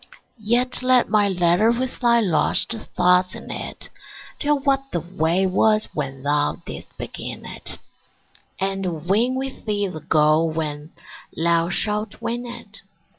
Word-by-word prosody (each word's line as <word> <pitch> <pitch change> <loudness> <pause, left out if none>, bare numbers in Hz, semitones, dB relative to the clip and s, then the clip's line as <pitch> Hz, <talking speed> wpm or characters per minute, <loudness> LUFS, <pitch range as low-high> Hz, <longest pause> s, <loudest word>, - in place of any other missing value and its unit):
Yet 240 +5 +1
let 255 -1 +4
my 210 -2 +4
letter 180 +3 +3
with 250 +2 -1
thy 235 -1 +4
lost 185 +4 +2 0.2
thoughts 180 +1 +3
in - - -8
it - - -6 0.5
Tell 295 0 +2
what 275 -1 0
the 170 - 0
way 170 +2 0
was 215 +3 +2
when 135 -3 -4
thou 145 0 +1
didst - - -9
begin - - -6
it, - - -7 0.8
And 190 -4 -2
win 230 +7 +2
with 265 0 -5
thee 205 -2 0
the 165 -5 -6
goal 155 +1 +3
when 155 -1 -4 0.5
thou 170 +1 +2
shalt 210 +3 -1
win 240 +1 -3
it. 240 - -9
195 Hz, 140 wpm, -22 LUFS, 165-235 Hz, 0.8 s, let